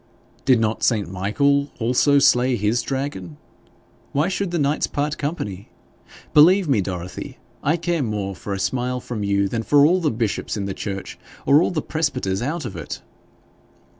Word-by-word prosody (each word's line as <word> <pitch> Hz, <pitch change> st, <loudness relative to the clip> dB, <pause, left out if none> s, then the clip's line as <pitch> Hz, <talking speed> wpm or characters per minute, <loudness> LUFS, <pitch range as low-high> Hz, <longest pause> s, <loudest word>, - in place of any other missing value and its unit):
'Did 130 Hz, -3 st, +5 dB
not 110 Hz, 0 st, 0 dB
St. 110 Hz, -4 st, +1 dB
Michael 140 Hz, +10 st, +1 dB
also 125 Hz, +5 st, +3 dB
slay 125 Hz, -2 st, +4 dB
his 110 Hz, +3 st, +1 dB
dragon? 130 Hz, -, -4 dB, 0.8 s
Why 150 Hz, +5 st, +2 dB
should 195 Hz, 0 st, -2 dB
the 175 Hz, -, -1 dB
knights 145 Hz, 0 st, +1 dB
part 145 Hz, +1 st, -2 dB
company? 105 Hz, -, -4 dB, 0.6 s
Believe 180 Hz, +5 st, +6 dB
me, 130 Hz, -8 st, +3 dB
Dorothy, 90 Hz, -1 st, -6 dB, 0.2 s
I 155 Hz, +4 st, +1 dB
care 170 Hz, -1 st, -1 dB
more 105 Hz, -5 st, -2 dB
for 100 Hz, -, -7 dB
a -, -, -5 dB
smile 125 Hz, +4 st, -1 dB
from 115 Hz, -3 st, -5 dB
you 100 Hz, 0 st, +1 dB
than 115 Hz, +3 st, -2 dB
for 145 Hz, +5 st, +5 dB
all 180 Hz, +4 st, +3 dB
the 155 Hz, -, +2 dB
bishops 110 Hz, -2 st, -2 dB
in 100 Hz, -, -2 dB
the 100 Hz, -, -3 dB
church, 95 Hz, -1 st, -6 dB, 0.3 s
or 145 Hz, +3 st, +6 dB
all -, -, +2 dB
the 160 Hz, -5 st, -2 dB
presbyters 130 Hz, -12 st, -1 dB
out 155 Hz, +6 st, -2 dB
of 95 Hz, -, -6 dB
it.' 80 Hz, -4 st, -7 dB
125 Hz, 170 wpm, -22 LUFS, 100-145 Hz, 0.8 s, Believe